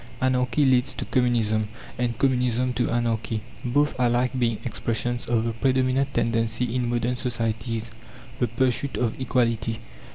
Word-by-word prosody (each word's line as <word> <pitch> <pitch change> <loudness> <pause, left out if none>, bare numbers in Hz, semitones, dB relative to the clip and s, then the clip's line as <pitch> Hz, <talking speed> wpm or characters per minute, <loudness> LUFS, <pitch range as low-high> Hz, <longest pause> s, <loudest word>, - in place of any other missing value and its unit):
Anarchy 130 +1 +2
leads 130 0 +3
to - - -4
Communism, 115 -4 +2 0.3
and 120 -2 -1
Communism 125 -1 +1
to 120 +1 0
Anarchy, 115 -2 -1 0.2
both 145 +4 +2
alike 125 0 +2
being 115 -3 +1
expressions 120 +2 -2
of 115 -2 +2
the 115 0 -1
predominant 130 +2 +1
tendency 115 0 0
in 125 -1 0
modern 120 +1 0
societies, 115 -2 -2 0.5
the 120 - +2
pursuit 130 +3 0
of 120 -2 0
equality. 115 -3 +1
120 Hz, 135 wpm, -25 LUFS, 115-125 Hz, 0.5 s, leads